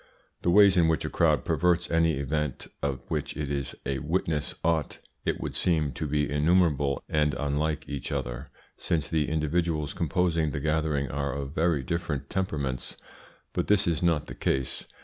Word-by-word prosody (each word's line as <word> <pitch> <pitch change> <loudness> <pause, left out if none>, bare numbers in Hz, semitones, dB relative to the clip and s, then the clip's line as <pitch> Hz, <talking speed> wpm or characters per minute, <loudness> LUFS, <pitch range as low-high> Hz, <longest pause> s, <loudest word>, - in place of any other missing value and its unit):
The - - +1
ways 100 0 +7
in 85 -2 +5
which 80 -3 +1
a - - -3
crowd - - +2
perverts 90 -1 +2
any 80 -1 +3
event 70 0 -2 0.2
of 70 -2 -1
which - - -2
it 75 -2 -3
is 70 -1 -2
a 70 -1 -1
witness 80 0 -1
ought, 80 -3 +1 0.3
it - - 0
would - - -4
seem, 80 -5 +1
to 75 +5 -4
be 75 0 +1
innumerable 75 -2 +2
and 75 -1 +1
unlike 75 +1 -1
each 70 - -5
other, - - -3 0.3
since 80 -4 -1
the 80 -3 0
individuals 80 0 0
composing 85 0 +1
the 70 - -3
gathering 75 -2 0
are 70 -1 -2
of 70 0 -4
very 80 -4 +1
different 75 -3 -3
temperaments. 75 -10 -2 0.6
But - - -1
this 105 0 +4
is 85 -3 0
not 85 -4 +2
the - - -8
case. 65 -1 -1
75 Hz, 170 wpm, -28 LUFS, 70-85 Hz, 0.6 s, ways